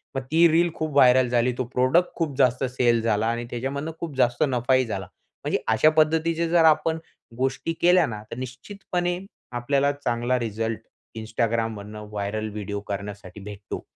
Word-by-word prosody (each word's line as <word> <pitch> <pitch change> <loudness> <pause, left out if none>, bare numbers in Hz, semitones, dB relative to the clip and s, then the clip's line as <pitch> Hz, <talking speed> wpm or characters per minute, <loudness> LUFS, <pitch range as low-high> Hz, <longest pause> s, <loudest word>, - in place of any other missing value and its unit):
मग 135 - -1
ती 170 +2 +6
रील 170 +2 +3
खूप 155 -1 -3
व्हायरल 130 -2 +6
झाली, 120 +1 +2
तो 130 - 0
प्रॉडक्ट 130 +8 +3
खूप 160 -5 -2
जास्त 125 -1 +3
सेल 125 -2 +2
झाला 110 -1 +1
आणि 120 +1 -2
त्याच्यामधनं 140 +6 -3
खूप 160 -5 -5
जास्त 120 +4 +2
नफाही 130 0 +2
झाला. 95 -4 -4 0.4
म्हणजे - - 0
अशा 115 +8 +5
पद्धतीचे 160 +2 +2
जर 170 -1 +4
आपण 160 +1 +3 0.4
गोष्टी 135 +5 -1
केल्या 180 -1 +5
ना, 105 -4 -6
तर 115 - -6
निश्चितपणे 175 - -4 0.4
आपल्याला 140 +3 +1
चांगला 125 -3 -1
रिझल्ट, 115 0 -3 0.4
Instagramमधनं 110 -2 -3
व्हायरल 105 +1 -3
व्हिडिओ 100 -1 -4
करण्यासाठी 100 -1 -6
भेटतो. 100 0 -7
125 Hz, 155 wpm, -24 LUFS, 110-155 Hz, 0.4 s, ती